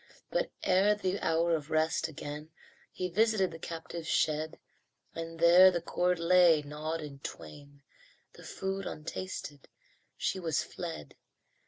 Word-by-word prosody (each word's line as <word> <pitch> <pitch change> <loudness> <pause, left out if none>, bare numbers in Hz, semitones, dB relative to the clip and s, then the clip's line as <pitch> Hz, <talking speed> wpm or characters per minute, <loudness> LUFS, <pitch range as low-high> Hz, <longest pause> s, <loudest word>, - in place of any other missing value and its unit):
But - - 0
ere 195 +3 +4
the 190 -1 -2
hour 165 +1 +2
of 150 -1 -5
rest, 160 +1 +1
again 150 0 -7 0.4
He 185 - -3
visited 210 0 +2
the 165 - -9
captive's 165 0 -6
shed, 155 0 0 0.6
And 165 0 -6
there 175 +3 +8
the 175 -2 -1
cord 180 +1 0
lay, 170 -2 +5
gnawed 155 +3 -4
in 145 -2 -8
twain 140 - -10 0.5
The - - -14
food 195 0 -4
untasted 150 -2 -6 0.5
she 190 - -1
was 165 -4 0
fled. 170 -2 -7
165 Hz, 135 wpm, -31 LUFS, 155-185 Hz, 0.6 s, there